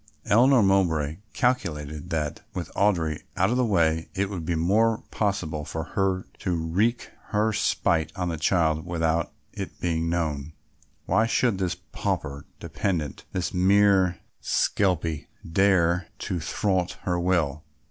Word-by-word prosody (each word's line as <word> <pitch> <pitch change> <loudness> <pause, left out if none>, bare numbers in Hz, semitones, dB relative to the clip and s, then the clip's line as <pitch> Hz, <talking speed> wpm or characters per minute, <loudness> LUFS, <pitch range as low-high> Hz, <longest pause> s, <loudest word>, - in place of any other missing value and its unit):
Eleanor 125 +2 +5
Mowbray 80 -6 +2 0.2
calculated 75 - -1
that, 75 -2 -2
with - - -5
Audry 85 -7 +1 0.2
out 95 +4 +3
of 125 - +1
the 130 - +3
way, 80 -7 +1
it 100 +1 -1
would 85 -5 -5
be 85 - +1
more 105 +7 +2
possible 90 -8 -1
for 80 +1 -4
her 95 -1 0
to 90 -2 -1
wreak 95 +9 0
her 110 0 +1
spite 80 -5 +1
on 90 -2 -2
the 80 - -3
child 80 -1 +2
without 85 -1 0 0.2
it - - -7
being 85 -1 0
known. 80 -3 -2 0.5
Why 110 +1 +3
should 115 -3 +1
this 90 -2 0
pauper 70 0 -4
dependent, 80 -8 -3
this 90 +4 -2
mere 95 -1 +4 0.2
skelpie, 85 -6 0 0.2
dare 90 -1 +3
to 90 - -3
thwart 90 +2 0
her 90 -1 0
will? 85 -5 0
90 Hz, 135 wpm, -26 LUFS, 80-100 Hz, 0.5 s, Eleanor